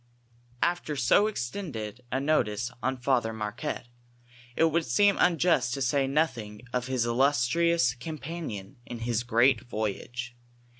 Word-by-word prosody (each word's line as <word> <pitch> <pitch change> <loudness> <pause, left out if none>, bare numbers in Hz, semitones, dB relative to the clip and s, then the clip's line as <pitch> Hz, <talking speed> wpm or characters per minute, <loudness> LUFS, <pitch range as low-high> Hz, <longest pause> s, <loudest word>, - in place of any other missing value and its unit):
Aftkr 175 -3 0
80 140 - +4
extended 125 - -5
n 135 +2 -1
notice 120 -6 +1
on 130 +1 -1
Fntlior 120 -3 +1
Marquette, 110 +5 -4 0.7
it - - +3
would 165 -1 0
Beem 205 -1 +5
luijiiet 165 -7 +3
to 140 - -3
say 135 +1 +1
notliing 125 -8 -1
of 125 0 -1
his 130 -3 0
illiistrions 135 +2 +2
companion 150 - -6
in 120 -1 -7
liis 120 0 0
great 120 0 +3
voyage. 120 +3 -4
125 Hz, 130 wpm, -28 LUFS, 120-155 Hz, 0.7 s, Beem